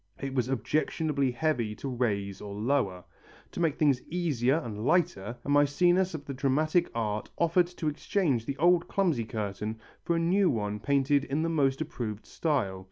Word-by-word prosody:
It 135 -1 -4
was 125 -2 0
objectionably 140 +3 0
heavy 120 -5 -1
to 140 - -6
raise 105 -6 -2
or 100 -1 -7
lower. 105 -5 0 0.5
To - - -7
make 165 -4 +1
things 140 -4 +3
easier 150 -7 +1
and 110 -9 -5
lighter, 130 - +1
a - - -7
Mæcenas 175 +6 +3
of 145 -2 -7
the 140 - -5
dramatic 155 +6 +1
art 105 -2 -2
offered 170 +1 +3
to 175 -2 -5
exchange 145 - 0
the 140 - -3
old 175 +2 +4
clumsy 165 - +1
curtain 105 0 -4 0.2
for 170 - 0
a - - +1
new 180 +3 +3
one 105 -2 -2
painted 140 +3 +2
in 145 +3 -1
the 165 - 0
most 140 -3 +1
approved 110 -8 -5
style. 120 - -1
140 Hz, 170 wpm, -29 LUFS, 115-160 Hz, 0.5 s, old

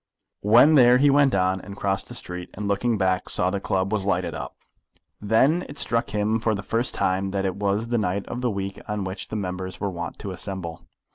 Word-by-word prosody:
When 120 +9 +6
there 125 -3 +7
he 140 +2 +4
went 140 -3 +4
on, 95 0 +1
and 100 0 -10
crossed 95 -1 -1
the - - -8
street, 90 0 -6
and 105 +1 -4
looking 110 +3 +1
back 95 -1 0
saw 90 +1 0
the 100 - -1
club 95 +1 -1
was 105 -3 0
lighted 100 - 0
up. - - -6 0.7
Then 130 - +3
it 145 - -9
struck 115 -3 +2
him 105 +2 0
for 110 -1 0
the 100 - -5
first 115 +4 0
time 95 +1 0
that 95 0 -2
it 95 0 -2
was 105 +3 -1
the 120 -1 +1
night 100 -1 -1
of 120 - -5
the 125 - +1
week 100 -2 -4
on 105 -2 -2
which 95 +1 -5
the - - -6
members 95 -2 -4
were 100 -1 -2
wont 85 0 -6
to 100 - -6
assemble. 90 -3 -5
100 Hz, 225 wpm, -24 LUFS, 95-115 Hz, 0.7 s, there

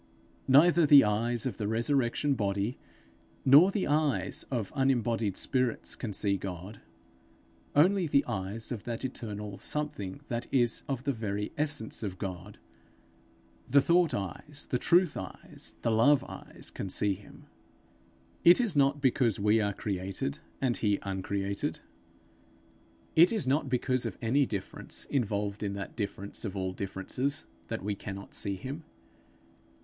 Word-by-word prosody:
Neither 165 +4 +6
the 145 -1 +9
eyes 115 +3 0
of 130 - -3
the 105 - -2
resurrection 120 +4 +1
body, 100 0 -1 0.7
nor 145 +8 +8
the 195 -1 -1
eyes 145 -11 +1
of 115 -7 -3
unembodied 120 -6 +1
spirits 125 -3 -1
can 115 - -5
see 100 0 0
God; 95 +2 -7 0.9
only 180 +4 +4
the 140 -1 +3
eyes 105 0 -4
of 115 -5 -4
that 120 +1 -4
eternal 105 -5 -6
something 145 -9 -4
that 120 -1 -3
is 120 -3 +2
of 130 -2 -2
the 140 - +1
very 105 -2 -3
essence 150 -7 -2
of 95 -4 -4
God, 95 +1 -6 1.1
the 140 +3 +6
thought 170 +3 +3
eyes, 120 - -6
the 125 - +1
truth 175 +1 +3
eyes, 95 - -8
the 115 - +2
love 130 +5 +4
eyes, - - -10
can 95 - -5
see 100 +2 +2
him. 100 +2 -14 1.0
It 175 +6 +8
is 225 -9 0
not 140 0 +3
because 125 -5 +2
we 105 +2 +3
are 100 -1 0
created 95 -7 -3 0.2
and 125 -3 +1
he 105 -2 +1
uncreated, 100 +1 -3 1.4
it 170 +3 +7
is 215 - 0
not 140 +1 +1
because 125 -1 +1
of 100 - -7
any 130 +4 +2
difference 100 -3 -2
involved 105 -6 -1
in 100 -2 -2
that 100 0 -6
difference 100 -2 -3
of 105 -3 -4
all 95 -1 -2
differences, 100 +10 -1 0.2
that 115 -3 -4
we 105 +1 -1
cannot 100 0 -8
see 100 -1 +2
him. 135 - -7
115 Hz, 145 wpm, -30 LUFS, 100-140 Hz, 1.4 s, the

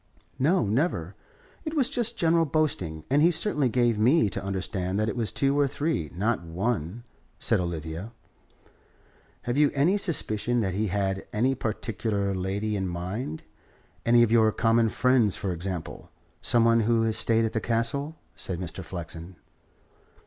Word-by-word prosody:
"No. 155 - +3
Never. 105 - -1 0.5
It 310 0 -4
was 270 -5 +3
just 235 -1 0
general 165 -1 +3
boasting. 95 - -1
And 145 +2 +4
he 165 - +6
certainly 160 -5 +1
gave 120 -2 +1
me 115 - +4
to - - -4
understand 95 -1 -2
that 110 +1 +1
it - - -4
was 115 -3 0
two 140 +1 +1
or 145 - +4
three, 145 - -2
not 105 +4 0
one," 95 +4 -3 0.3
said - - +1
Olivia. 85 +3 -4 1.3
"Have 125 +4 -1
you 150 -1 +5
any 170 +9 +3
suspicion 120 - +1
that 95 -4 -1
he 105 +3 0
had 95 0 -2
any 125 +5 +1
particular 110 -3 -2
lady 100 +3 -2
in 95 -2 -1
mind 90 0 -4 0.6
any 120 0 +5
of 115 - +1
your 110 -2 +5
common 115 0 +2
friends, 120 -4 +2
for 95 - -3
example 90 -1 -5 0.3
some 115 -1 +3
one 115 0 +4
who 115 0 +2
has 110 -1 +1
stayed 115 0 +2
at 110 - -3
the 110 - -1
Castle?" 120 +8 -1 0.2
said 95 - -3
Mr. 90 +1 -5
Flexen. 85 0 -7
110 Hz, 160 wpm, -26 LUFS, 95-130 Hz, 1.3 s, he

